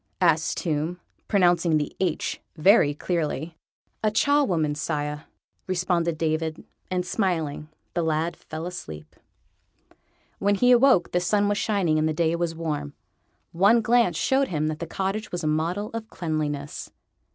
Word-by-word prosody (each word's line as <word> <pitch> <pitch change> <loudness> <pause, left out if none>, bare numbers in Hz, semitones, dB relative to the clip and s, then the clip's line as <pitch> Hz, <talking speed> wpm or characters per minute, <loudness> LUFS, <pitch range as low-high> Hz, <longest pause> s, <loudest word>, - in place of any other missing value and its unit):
asked 165 -3 +2
Tomb, 160 +2 -2 0.3
pronouncing 175 -5 +3
the 145 -1 -3
H 180 -4 -1 0.2
very 155 -2 +5
clearly. 160 -1 -2 0.5
"A 215 - +4
charwoman, 210 - +2
sire," 150 0 -3 0.4
responded 175 -3 0
David; 160 0 -1 0.3
and, 180 -1 -1
smiling, 165 -7 -1 0.2
the 175 - 0
lad 160 +1 0
fell 160 +1 -7
asleep. 80 - -8 1.2
When 205 +1 +2
he 245 +5 +4
awoke 245 -7 +5
the 180 - +2
sun 205 +3 +1
was 205 0 0
shining 185 -8 +1
and 155 +1 +1
the - - 0
day 165 +1 +1
was 170 -1 -2
warm. 150 -3 -4 0.6
One 200 +7 +4
glance 230 -7 +3
showed 270 +1 +2
him 155 -2 -1
that 155 0 -4
the 170 - -4
cottage 195 +5 -3
was 175 -1 -4
a - - 0
model 170 +7 -1
of 225 -1 -5
cleanliness. 150 -5 -3
170 Hz, 145 wpm, -25 LUFS, 155-195 Hz, 1.2 s, very